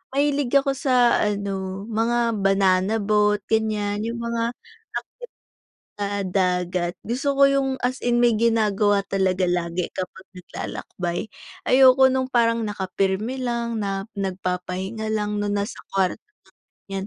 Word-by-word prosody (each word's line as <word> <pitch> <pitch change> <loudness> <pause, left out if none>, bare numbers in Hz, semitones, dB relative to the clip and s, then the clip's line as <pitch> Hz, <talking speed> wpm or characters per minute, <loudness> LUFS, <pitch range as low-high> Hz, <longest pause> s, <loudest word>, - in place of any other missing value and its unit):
mahilig 280 -2 +1
ako 275 0 +4
sa 255 -3 +3
ano, 195 -2 -2
mga 230 0 0
banana 195 +1 +3
boat 210 -1 +2
ganyan 210 -2 0
yung 235 0 -4
mga 235 0 -1
active 460 - -24 1.3
sa 200 -1 -2
dagat, 180 -1 0 0.2
gusto 265 +5 0
ko 275 - +8
yung 275 -1 +1
as 255 +2 -2
in 240 0 +2
may 240 -2 +4
ginagawa 210 -3 +2
talaga 190 -1 +1
lagi 175 0 -1
kapag 185 +1 -6
naglalakbay. 180 +2 -5 0.3
Ayoko 260 0 +6
nung 260 0 0
parang 230 -2 +2
nakapirmi 195 +5 -2
lang 235 -2 -2
na 195 -1 -2
nagpapahinga 190 +2 -3
lang 210 -1 -1
no, 205 - -1
nasa 205 +2 -2
kwarto 190 -2 0 0.5
lang 195 0 -7
210 Hz, 125 wpm, -23 LUFS, 190-235 Hz, 1.3 s, ko